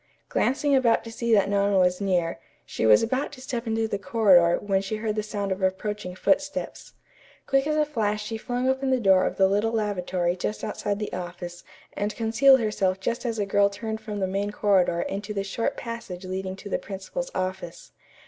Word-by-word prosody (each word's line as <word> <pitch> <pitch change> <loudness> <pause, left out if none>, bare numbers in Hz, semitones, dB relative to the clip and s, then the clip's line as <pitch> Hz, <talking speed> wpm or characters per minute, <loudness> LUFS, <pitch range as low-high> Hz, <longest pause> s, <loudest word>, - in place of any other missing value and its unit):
Glancing 280 +2 +1
about 240 -4 +3
to 230 - -8
see 235 +1 -2
that 205 -3 +5
no 200 0 +1
one 200 0 +2
was 180 0 +2
near, 175 -6 0 0.3
she 110 - -1
was 105 -1 +6
about 260 +6 -1
to 270 - -11
step 245 -2 -4
into 225 0 0
the 200 -2 -3
corridor 185 -4 +4
when 195 -2 0
she 195 +2 -3
heard 215 0 -2
the 215 - 0
sound 205 -2 -4
of 190 +1 -2
approaching 190 0 -2
footsteps. 290 +7 -1 0.5
Quick 270 +1 +2
as 305 - +1
a 305 0 +3
flash 215 -7 -1
she 225 +1 -4
flung 245 +3 -2
open 265 +1 +1
the 260 -1 +2
door 190 -4 +4
of - - -4
the 190 - +5
little 205 +3 +1
lavatory 185 -5 -1
just 210 +3 -4
outside 205 -1 -2
the 210 0 -5
office 175 -1 -6 0.3
and 205 +1 -2
concealed 235 +4 +5
herself 195 -4 0
just 235 +6 -2
as 230 -1 -2
a 205 - 0
girl 200 0 +3
turned 220 +2 -5
from 210 -2 -5
the 190 - +1
main 195 +2 -2
corridor 190 -5 +2
into 205 +2 -4
the 195 - -1
short 200 +4 -2
passage 230 -6 -6
leading 185 0 -4
to 195 - -10
the - - -1
principal's 210 - -6
office. 185 -2 -4
205 Hz, 205 wpm, -25 LUFS, 190-230 Hz, 0.5 s, was